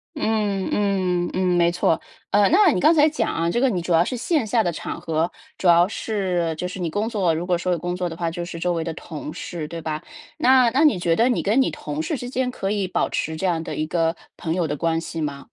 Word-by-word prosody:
嗯 210 -7 0
嗯 185 -4 +1
嗯， 185 0 0
没 170 0 +4
错。 175 -2 +1 0.3
呃， 205 -1 +4
那 385 +3 +6
你 - - 0
刚 315 - +5
才 305 0 +5
讲 310 - -1
啊， 165 +1 0
这 240 - 0
个 270 - +3
你 180 -3 -1
主 175 - -4
要 170 +1 +4
是 255 - -3
线 280 +2 0
下 225 +2 +2
的 175 -4 0
场 165 - -6
合， 165 0 -1 0.3
主 190 - -1
要 175 +1 +6
是 185 -7 -1
就 180 - -3
是 180 +1 -7
你 175 - -1
工 210 +6 -1
作 190 -8 +1
如 170 +3 -3
果 180 -1 +2
说 180 +1 -2
有 170 - -2
工 175 +2 -3
作 180 0 -2
的 165 - -6
话 170 -1 -2
就 175 +1 -5
是 170 -1 -7
周 175 +1 0
围 165 -1 -1
的 165 -1 -4
同 155 -1 -7
事， 165 -3 -6
对 165 +1 -7
吧？ 155 0 -4 0.3
那 255 -4 +5
那 270 +6 +2
你 280 - +4
觉 165 -1 +2
得 235 +3 +3
你 245 - +1
跟 215 +7 +2
你 265 - +2
同 300 0 -6
事 320 -1 -2
之 245 -1 -6
间 255 0 -1
可 195 -5 -3
以 200 -2 0
保 - - 0
持 160 - -2
这 185 +4 -1
样 165 -2 0
的 - - -5
一 155 0 -2
个 165 0 0 0.2
朋 160 - -2
友 175 -2 0
的 150 -1 -3
关 165 +1 0
系 165 - -6
吗？ 145 -3 -3
180 Hz, 290 characters per minute, -23 LUFS, 165-220 Hz, 0.3 s, 那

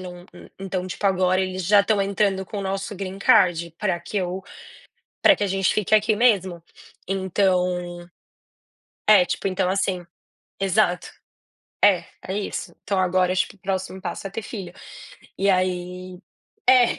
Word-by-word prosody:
não, 180 -1 -9
hum, 175 - -13
então, 190 -1 -3
tipo, 190 +2 -3
agora 185 -1 +2
eles 185 -1 -3
já 205 +2 +6
estão 200 0 +1
entrando 195 -1 0
com 205 - -6
o - - -3
nosso 195 +1 -3
Green 195 0 -6
Card 170 -3 +3
pra 190 -5 -1
que 175 +5 -7
eu 185 0 -2 0.8
pra - - +7
que 205 - -1
a - - 0
gente 195 0 +1
fique 215 0 +1
aqui 215 0 +3
mesmo. 190 -7 +2 0.4
Então 180 -2 0 1.0
é, 205 -4 +7
tipo, 180 - -3
então 185 -1 0
assim. 190 -2 -1 0.6
Exato. 190 -2 +1 0.7
É, 185 -4 +5 0.2
é 190 - -2
isso. 210 - -4
Então 195 -2 -1
agora, 185 0 +2
tipo, 190 - -1
o - - -27
próximo 190 0 -4
passo 180 +1 -5
é - - -9
ter 200 +4 -5
filho. 195 -5 -7 0.6
E 200 +1 +2
aí 180 0 -1 0.5
é. 250 -2 +5
190 Hz, 160 wpm, -23 LUFS, 180-200 Hz, 1.0 s, pra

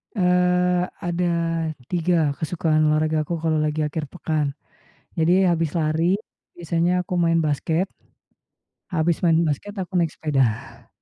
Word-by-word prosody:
Eee, 180 -1 +2 0.2
ada 175 0 0 0.6
3 170 -4 +2
kesukaan 155 -1 +1
olahragaku 155 +1 +1
kalau 160 -1 +1
lagi 155 0 0
akhir 150 0 -3
pekan, 150 -4 -2 0.6
jadi 180 +3 +4
habis 165 -2 0
lari, 165 +3 +1 0.4
biasanya 175 +1 0
aku 180 - -5
main 165 -1 +3
basket 160 +5 0 1.0
habis 170 -2 0
main 165 -2 +4
basket, 165 +7 -3
aku 185 -1 -2
naik 165 -3 +1
sepeda. 135 -8 -1
165 Hz, 120 wpm, -23 LUFS, 155-180 Hz, 1.0 s, jadi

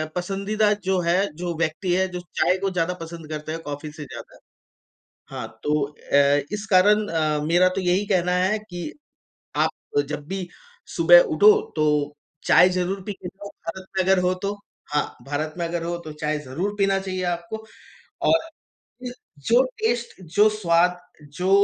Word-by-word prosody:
पसंदीदा 200 +4 0
जो 190 -1 +1
है, 175 +3 +2
जो 175 0 -3
व्यक्ति 170 +3 -1
है 190 +1 +2
जो 180 -1 -6 0.2
चाय 185 - +3
को 195 - +1
ज़्यादा 180 0 0
पसंद 165 -1 -8
करते 155 0 -5
है, 160 - -2
कॉफ़ी 145 -1 -6
से 150 0 -8
ज़्यादा। - - -10 0.9
हाँ 130 -4 -5 0.2
तो 150 - +1 0.4
अ, - - +7 0.4
इस 210 0 -3
कारण 210 +3 +5
अ, 155 -4 0
मेरा 175 +3 +4
तो 195 - -1
यही 185 +3 +1
कहना 180 -3 +2
है 200 +3 +2
कि 175 - -5 0.7
आप 145 - -2
जब 150 -1 -5
भी 190 0 -4 0.5
सुबह - - +8 0.2
उठो 425 +1 +8 0.2
तो 155 - +2 0.6
चाय 180 - +7
ज़रूर 185 +2 -1
पी 205 - -3
के 185 - -9
जाओ 200 +2 -10
भारत 185 +3 -7
में 190 - +3
अगर 190 0 +4
हो 180 +1 +2
तो। 200 +1 0 0.4
हाँ, 150 - +2 0.2
भारत 155 +2 -2
में 170 - -1
अगर 170 0 -3
हो 170 0 -2
तो 155 - -6
चाय 150 0 0
ज़रूर 150 +9 -3
पीना 195 -1 +2
चाहिए 185 -1 -4
आपको 175 +6 -6 0.7
और 325 - +6 1.1
जो 240 +3 +5 0.2
टेस्ट 235 -3 -1
जो 210 +1 +6
स्वाद, 180 -4 +2 0.3
जो 165 +6 -4
180 Hz, 170 wpm, -23 LUFS, 165-195 Hz, 1.1 s, सुबह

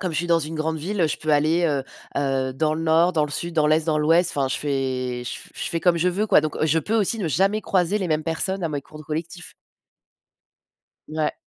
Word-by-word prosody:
comme 185 -3 -2
je - - -3
suis 175 - 0
dans 170 -1 +4
une 155 +1 -4
grande 160 +1 -1
ville, 190 +6 -3
heu, - - +4
je - - -2
peux 155 - -2
aller, 155 +4 +3
heu 145 -4 0 0.4
heu, 135 -2 0
dans 155 +3 0
le 160 - -3
Nord, 165 +2 +3
dans 155 -2 +2
le 150 - -7
Sud, 170 +3 -3
dans 155 -2 +3
l'Est, 155 +1 +2
dans 155 -2 +2
l'Ouest. 165 +3 +3
Enfin, 135 -2 +1
je 130 - -1
fais 130 -3 -2
je - - -4
f - - -13
je - - -3
fais 170 - 0
comme 175 -1 +3
je 175 +2 +2
veux, 195 +4 0
quoi, 200 - +5
donc 155 0 -3
je 160 +1 +2
peux 205 +7 -2
aussi 225 +1 +1
ne 185 -6 -1
jamais 195 +8 +2
croiser 190 0 +1
les 190 -3 -2
mêmes 155 -1 0
personnes 185 +3 -1
à - - 0
mes 145 -2 -4
cours 155 - -14
de 155 - -11
collectif. 165 +3 -5 1.5
Ouais. 155 0 -1
160 Hz, 260 wpm, -23 LUFS, 150-175 Hz, 1.5 s, quoi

